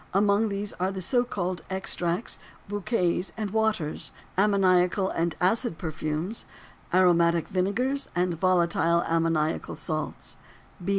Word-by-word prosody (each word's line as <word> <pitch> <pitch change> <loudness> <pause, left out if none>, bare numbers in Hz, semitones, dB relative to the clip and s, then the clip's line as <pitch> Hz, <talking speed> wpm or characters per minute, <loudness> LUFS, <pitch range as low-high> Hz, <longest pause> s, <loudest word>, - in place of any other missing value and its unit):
Among 205 +2 +3
these 200 0 -3
are 185 +2 +1
the 190 - -5
so 245 +7 +2
called 185 -7 -3
extracts, 190 0 -1 0.3
bouquets, 185 -3 0
and 210 -3 -3
waters. 215 -8 -1 0.2
Ammoniacal 190 -1 +3
and 165 -1 -1
acid 190 0 +1
perfumes: 160 +4 -3 0.4
aromatic 170 -2 +4
vinegars 235 +10 0
and 180 0 +1
volatile 170 -1 +2
ammoniacal 165 -1 0
salts. 155 -1 -5
185 Hz, 110 wpm, -27 LUFS, 170-200 Hz, 0.4 s, aromatic